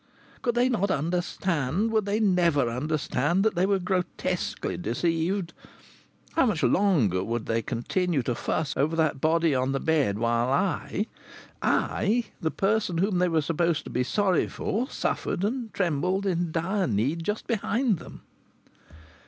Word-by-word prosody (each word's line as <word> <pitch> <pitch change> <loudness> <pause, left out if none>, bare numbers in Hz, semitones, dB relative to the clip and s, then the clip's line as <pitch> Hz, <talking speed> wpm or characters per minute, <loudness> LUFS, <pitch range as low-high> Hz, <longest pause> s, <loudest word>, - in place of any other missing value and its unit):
Could 240 -2 0
they 245 +1 +4
not 210 -6 0
understand, 175 - 0
would 215 -2 +1
they 205 +2 +1
never 175 - +3
understand, 150 +6 0
that 220 - +3
they 180 +2 +1
were 200 0 +3
grotesquely 180 -1 -2
deceived? 170 - -1 0.8
How 325 -5 +3
much 195 -8 0
longer 135 - +3
would 115 +2 -3
they 115 0 0
continue 135 - -1
to 120 - -1
fuss 145 +4 -2
over 150 +4 +1
that 155 -4 +1
body 165 0 +3
on 130 +1 0
the 135 - 0
bed 145 -11 +1
while 115 +2 +1
I, 190 +5 0 0.6
I, 225 +4 +1 0.2
the 160 - +1
person 195 -1 0
whom 190 +1 +1
they 180 0 +3
were 160 -2 +1
supposed 165 +1 0
to - - -9
be 125 - +1
sorry 190 +6 +1
for, 245 +7 -2
suffered 180 - -2
and 230 +1 -2
trembled 185 +2 0
in 175 -3 0
dire 185 +5 0
need 130 +10 0
just 210 +4 -2
behind 230 - 0
them? - - -12
170 Hz, 155 wpm, -26 LUFS, 145-200 Hz, 0.8 s, they